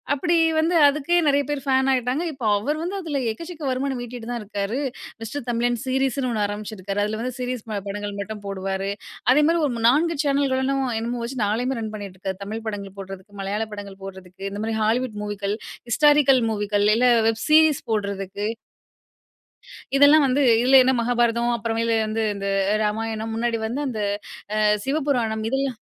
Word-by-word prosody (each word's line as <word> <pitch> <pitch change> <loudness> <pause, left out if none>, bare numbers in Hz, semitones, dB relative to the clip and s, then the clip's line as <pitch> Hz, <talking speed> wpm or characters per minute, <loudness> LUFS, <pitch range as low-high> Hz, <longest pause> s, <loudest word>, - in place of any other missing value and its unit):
அப்டி 340 +4 +1 0.2
வந்து 330 +3 +2
அதுக்கே 300 +4 +1
நிறைய 285 0 +3
பேர் 290 -2 -2
ஃபேன் 265 0 +2
ஆயிட்டாங்க. 255 +5 0
இப்போ 265 -4 -6
அவர் 295 +9 -2
வந்து, 365 +4 -3
அதில 305 -5 -2
எக்கச்சக்க 330 +5 -9
வருமானம் 260 0 -2
ஈட்டிட்டு 240 -1 -8
தான் 240 -1 -3
இருக்காரு. 205 +4 -3 0.4
மிஸ்டர் 250 +3 -6
தமிழன் 240 0 0
சீரிஸுன்னு 265 0 0
ஒண்ணு 215 -3 0
ஆரம்பிச்சுருக்கார். 205 -1 -4
அதில 215 +1 -2
வந்து 250 +1 -4
சீரீஸ் 250 -2 -3 0.3
படங்கள் 205 0 -5
மட்டும் 210 0 -7
போடுவாரு. 195 0 -3 0.4
அதேமாரி 300 +5 +4
ஒரு 235 -4 -3
4 325 +6 +2
சேனல்களும் 275 -1 +1 0.2
என்னன்னமோ 235 +2 -3
வச்சு, 245 0 -4
நாளையுமே 245 +5 -1
ரன் 220 -1 -5
பண்ணிட்டிருக்கார். 190 -1 -6
தமிழ் 220 +3 -6
படங்கள் 200 -2 -5
போடுறதுக்கு, 195 +1 -9
மலையாள 200 +3 -2
படங்கள் 200 -2 -8
போடுறதுக்கு, 190 -1 -10
இந்த 200 +1 -6
மாரி 225 0 -2
ஹாலிவுட் 225 0 0
மூவிக்கள், 205 0 -2 0.3
ஹிஸ்டாரிக்கல் 285 0 +5
மூவிக்கள். 205 -1 0
இல்லை 250 +2 +4 0.2
வெப் 225 0 0
சீரிஸ் 310 -1 +6
போடுறதுக்கு 200 -1 -2 1.5
இதெல்லாம் 285 +2 +7
வந்து 270 +3 +2 0.2
இதுல 260 +2 +7
என்ன 260 - +3
மகாபாரதம், 235 0 +1
அப்புறமேல 230 0 0
வந்து 220 +1 -1
இந்த 200 0 -4 0.4
ராமாயணம், 220 +1 -2
முன்னாடி 230 0 0
வந்து 245 +6 -3
அந்த 225 -4 -4 0.6
அ, - - 0 0.3
சிவபுராணம். 265 -7 0
இதெல்லாம் 270 -2 -1
235 Hz, 155 wpm, -23 LUFS, 205-270 Hz, 1.5 s, இதெல்லாம்